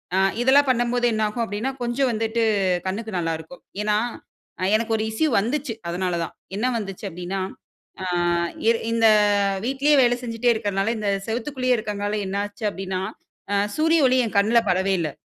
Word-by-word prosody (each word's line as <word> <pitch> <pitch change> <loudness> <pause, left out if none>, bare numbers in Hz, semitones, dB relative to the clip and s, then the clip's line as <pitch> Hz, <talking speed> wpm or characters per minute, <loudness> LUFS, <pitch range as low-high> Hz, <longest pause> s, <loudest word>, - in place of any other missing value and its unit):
ஆ, - - +2 0.2
இதெல்லாம் 275 +3 +5
பண்ணும்போது 240 0 +1
என்னாகும் 215 +2 0
அப்டீன்னா 215 +6 -3
கொஞ்சம் 245 +3 +1
வந்துட்டு 225 +1 0 0.4
கண்ணுக்கு 215 +3 -3
நல்லா 165 -1 -1
இருக்கும். 160 +2 -12 0.2
ஏன்னா, 210 0 +1 0.8
எனக்கு 225 +1 0
ஒரு 215 - -1
இஷ்யூ 265 +9 +1
வந்துச்சு. 250 +4 -2 0.2
அதனால 180 +1 -1
தான். 165 - -6 0.2
என்ன 220 - 0
வந்துச்சு 200 -2 -6
அப்டீன்னா, 180 +2 -4 0.6
ஆ - - -3 0.6
இர் 230 - +3
இந்த 230 -1 +4 0.6
வீட்லயே 275 +3 +3
வேலை 245 -1 +4
செஞ்சுட்டே 235 0 +1
இருக்குறதுனால 205 0 -1
இந்த 210 -1 -1 0.2
செவுத்துக்குள்ளயே 255 +2 0
இருக்குறதுனால 210 -1 -3
என்ன 190 - -4
ஆச்சு 205 +2 -8
அப்டீன்னா, 190 -1 -4 0.5
அ - - +2 0.2
சூரிய 320 -2 +4
ஒளி 255 0 +3
என் 220 - -6
கண்ணுல 230 +3 +4
படவே 190 +2 +2
இல்ல. 155 -3 -2
220 Hz, 155 wpm, -23 LUFS, 195-245 Hz, 0.8 s, இதெல்லாம்